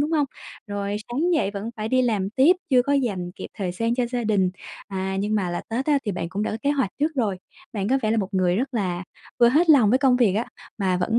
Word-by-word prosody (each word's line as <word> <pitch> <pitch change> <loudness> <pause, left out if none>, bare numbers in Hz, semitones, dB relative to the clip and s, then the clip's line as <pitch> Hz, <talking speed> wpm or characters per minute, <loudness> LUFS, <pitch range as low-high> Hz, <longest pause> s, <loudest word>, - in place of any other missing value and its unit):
đúng 295 +2 0
hông? 295 -3 +2 0.4
Rồi 205 0 -3
sáng 310 +9 0
dậy 200 -11 +1
vẫn 205 +3 -5
phải 215 0 -3
đi 255 +2 +3
làm 205 -5 0
tiếp, 285 +10 +4
chưa 250 -2 +5
có 280 +3 -1
dành 200 -10 0
kịp - - -7
thời 185 -3 -3
gian 230 +5 0
cho 250 0 +1
gia 240 -1 -3
đình, 195 -4 +2 0.4
à, 190 -1 -3
nhưng 210 +2 -1
mà 190 -4 0
là 175 - -2
Tết 250 +5 -2
á 290 -2 +3
thì 205 - -1
bạn 170 -1 -4
cũng 200 +3 -3
đã - - -1
có 220 - -3
kế 285 - +2
hoạch 270 -9 0
trước 310 +2 +1
rồi. 215 -8 0 0.3
Bạn 200 -2 -2
có 270 +2 +3
vẻ 215 - +1
là 225 - +2
một 195 -3 -1
người 180 -1 +2
rất 260 +2 -2
là 185 -4 -1 0.4
vừa 235 - +7
hết 320 +6 +4
lòng 245 -9 +6
với 255 - +4
công 265 -3 +4
việc 220 -6 +3
á, 225 +3 0 0.3
mà 185 -2 +1
vẫn 225 +6 +1
220 Hz, 275 wpm, -24 LUFS, 195-260 Hz, 0.4 s, vừa